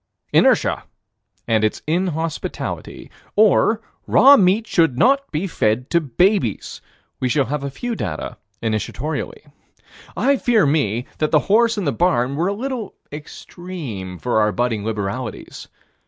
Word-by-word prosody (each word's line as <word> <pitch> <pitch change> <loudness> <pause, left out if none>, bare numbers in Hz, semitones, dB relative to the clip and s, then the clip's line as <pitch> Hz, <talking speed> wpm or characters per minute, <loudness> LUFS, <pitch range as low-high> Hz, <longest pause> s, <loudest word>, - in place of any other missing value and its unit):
Inertia - - +3 0.6
and 110 -2 +2
its 110 - -1
inhospitality. 165 -1 -3 0.2
Or 215 +1 +4 0.3
raw 275 +2 +7
meat 200 +1 +3
should 165 - +2
not 275 - +3
be 155 +5 -2
fed 125 - -1
to 170 - +3
babies. 160 - 0 0.4
We 130 - 0
shall 140 +1 +2
have 145 +1 -3
a 140 - -3
few 240 - -4
data - - -5 0.3
initiatorily. 150 - -3 0.7
I 275 +2 +3
fear 240 -6 +3
me 135 -6 0
that 155 - +1
the 155 - +3
horse 230 +1 +4
and 200 - -2
the 140 - +1
barn 140 -6 +1
were 165 +5 0
a 200 - 0
little 240 -1 -5 0.2
extreme 145 - -8
for 120 +3 0
our 105 0 +2
budding 115 -2 -1
liberalities. 110 +3 -5
155 Hz, 140 wpm, -20 LUFS, 120-205 Hz, 0.7 s, raw